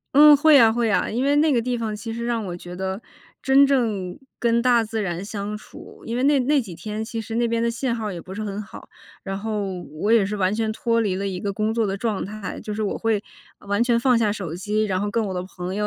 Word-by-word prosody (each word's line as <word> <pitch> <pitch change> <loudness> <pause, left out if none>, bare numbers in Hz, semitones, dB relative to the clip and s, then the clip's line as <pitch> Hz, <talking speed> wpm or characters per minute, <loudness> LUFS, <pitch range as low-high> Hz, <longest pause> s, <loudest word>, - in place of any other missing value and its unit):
嗯， 300 +1 +9
会 295 +1 +6
啊 230 -2 +7
会 230 -2 +1
啊， - - +1
因 240 +4 -1
为 285 +1 +3
那 305 0 +4
个 235 - +2
地 245 +1 -1
方 220 -2 -3
其 225 +2 -6
实 235 +1 -4
让 235 -2 -1
我 175 -2 -5
觉 175 0 -9
得 190 +2 -3 0.4
真 275 +1 +6
正 220 -10 0 0.2
跟 235 0 +2
大 240 -2 +4
自 220 0 -3
然 175 -2 -3
相 205 0 -4
处。 - - -14
因 235 +2 -3
为 255 - 0
那 285 0 +4
那 280 +2 +2
几 185 -6 -9
天， 210 +5 -5
其 225 -1 -4
实 225 +1 -6
那 235 0 +2
边 230 0 0
的 235 - +1
信 235 +1 -1
号 215 -3 -3
也 175 - -6
不 190 +2 -9
是 215 - -4
很 205 0 -4
好， 210 - -12 0.3
然 195 0 -4
后 200 -4 -3 0.2
我 215 - +2
也 225 -4 +5
是 205 +2 -3
完 190 -1 +1
全 220 0 -1
脱 230 +1 0
离 205 -4 0
了 195 +1 -3
一 190 -2 -3
个 200 +1 -3
工 215 +2 -1
作 225 -2 +1
的 195 - -1
状 210 0 -2
态， 210 +1 -6
就 210 - -5
是 215 +1 -2
我 205 - -2
会 220 -2 0 0.4
完 205 +2 -1
全 240 -1 +3
放 245 0 +3
下 210 -3 +2
手 180 -7 -5
机， 210 +5 -1
然 190 -3 0
后 205 - -1
跟 220 +1 0
我 195 - -3
的 180 - -2
朋 185 0 -6
友 210 +1 0
215 Hz, 290 characters per minute, -23 LUFS, 200-235 Hz, 0.4 s, 嗯